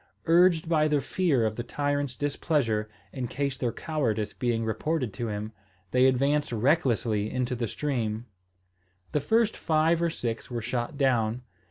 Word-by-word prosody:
Urged 170 Hz, 0 st, +4 dB
by 155 Hz, -2 st, +3 dB
the 150 Hz, -1 st, +2 dB
fear 140 Hz, -5 st, +1 dB
of 110 Hz, 0 st, -1 dB
the 120 Hz, -, -2 dB
tyrant's 145 Hz, 0 st, -1 dB
displeasure, 140 Hz, -7 st, 0 dB, 0.2 s
in 130 Hz, -2 st, -3 dB
case 140 Hz, +2 st, -2 dB
their 125 Hz, -2 st, -1 dB
cowardice 115 Hz, -11 st, -2 dB
being 115 Hz, -2 st, -1 dB
reported 125 Hz, +2 st, -1 dB
to 120 Hz, -, -3 dB
him, 105 Hz, 0 st, -4 dB, 0.4 s
they 130 Hz, +1 st, +5 dB
advanced 140 Hz, +3 st, +2 dB
recklessly 120 Hz, -4 st, +1 dB
into 125 Hz, +1 st, -1 dB
the 120 Hz, -1 st, -2 dB
stream. 115 Hz, -5 st, -2 dB, 0.9 s
The 150 Hz, -, +1 dB
first 220 Hz, +9 st, +2 dB
five 160 Hz, +1 st, +2 dB
or 170 Hz, -, +2 dB
six 120 Hz, -6 st, -4 dB
were 120 Hz, -2 st, -3 dB
shot 120 Hz, +4 st, -3 dB
down. 125 Hz, -3 st, +1 dB
130 Hz, 155 wpm, -27 LUFS, 115-150 Hz, 0.9 s, they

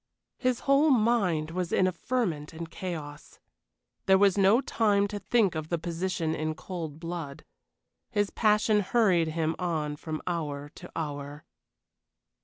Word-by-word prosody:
His 255 Hz, -2 st, 0 dB
whole 280 Hz, +3 st, +4 dB
mind 215 Hz, -, +2 dB
was 180 Hz, 0 st, -3 dB
in 185 Hz, -, +3 dB
a 185 Hz, -, +2 dB
ferment 170 Hz, -6 st, -2 dB
and 165 Hz, 0 st, -7 dB
chaos. 155 Hz, -5 st, -7 dB, 0.7 s
There 190 Hz, 0 st, +6 dB
was 195 Hz, -1 st, +4 dB
no 200 Hz, +3 st, +5 dB
time 205 Hz, -6 st, +2 dB
to 205 Hz, -, -4 dB
think 215 Hz, -4 st, +2 dB
of 155 Hz, -1 st, -5 dB
the 170 Hz, -, 0 dB
position 170 Hz, -1 st, -2 dB
in 155 Hz, 0 st, -2 dB
cold 160 Hz, -4 st, -6 dB
blood. 165 Hz, -4 st, -6 dB, 0.6 s
His 205 Hz, -3 st, 0 dB
passion 210 Hz, -1 st, +3 dB
hurried 195 Hz, -5 st, +3 dB
him 160 Hz, 0 st, -1 dB
on 160 Hz, -5 st, -1 dB
from 155 Hz, +1 st, -6 dB
hour 145 Hz, -4 st, -3 dB
to 175 Hz, +4 st, -12 dB
hour. 145 Hz, -1 st, -5 dB
175 Hz, 145 wpm, -28 LUFS, 155-205 Hz, 0.7 s, There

